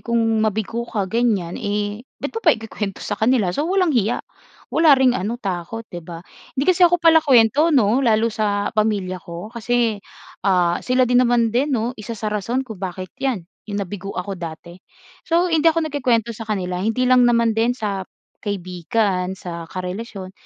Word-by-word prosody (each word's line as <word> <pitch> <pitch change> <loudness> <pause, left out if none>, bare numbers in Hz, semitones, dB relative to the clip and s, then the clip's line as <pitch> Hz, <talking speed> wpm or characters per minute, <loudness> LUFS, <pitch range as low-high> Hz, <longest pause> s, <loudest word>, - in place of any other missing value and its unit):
kung 235 0 -2 0.2
mabigo 220 +2 -1
ka 205 -3 -1
ganiyan, 200 -4 0
eh 205 0 -2 0.2
ba't 285 - -5
mo 455 - -4
pa 320 - +4
ikukuwento 215 -3 -6
sa 205 0 -4
kanila? 220 -6 +2
So, 300 - -1
walang 370 -4 +2
hiya. 230 -2 0 0.5
Wala 315 -4 +6
ring 260 -1 +4
ano, 225 +2 -2
takot, 200 +1 -4
'di 175 - -5
ba? 170 +1 -10 0.3
Hindi 275 - +1
kasi 370 0 +2
ako 350 - +3
palakuwento 305 -4 +5
'no, 250 -5 +3
lalo 225 -3 +2
sa 205 -2 -1
pamilya 205 -4 0
ko. 175 +7 -8
Kasi, 235 -2 0 0.4
ah, 180 -3 +2
sila 255 0 +2
din 245 +1 +4
naman 235 -2 +2
din 265 +5 +1
'no, 230 +3 -1
1 225 +2 -6
sa 215 0 -3
rason 235 +6 -1
kung 220 -6 -9
bakit 185 0 -5
'yan, 250 -10 -1 0.2
yung 205 - -3
nabigo 195 0 -5
ako 180 0 -4
dati. 170 +2 -8 0.5
So, 345 +1 +2
hindi 325 +1 +4
ako 325 0 +1
nagkukuwento 250 -6 0
sa 220 0 -9
kanila, 180 -3 -2
hindi 225 +5 0
lang 250 -1 +5
naman 235 -1 +3
din 230 +3 +1
sa 200 -4 -3 0.3
kaibigan, 190 0 -1
sa 170 -2 -7
karelasyon. 190 +1 -6
220 Hz, 175 wpm, -21 LUFS, 190-250 Hz, 0.5 s, Wala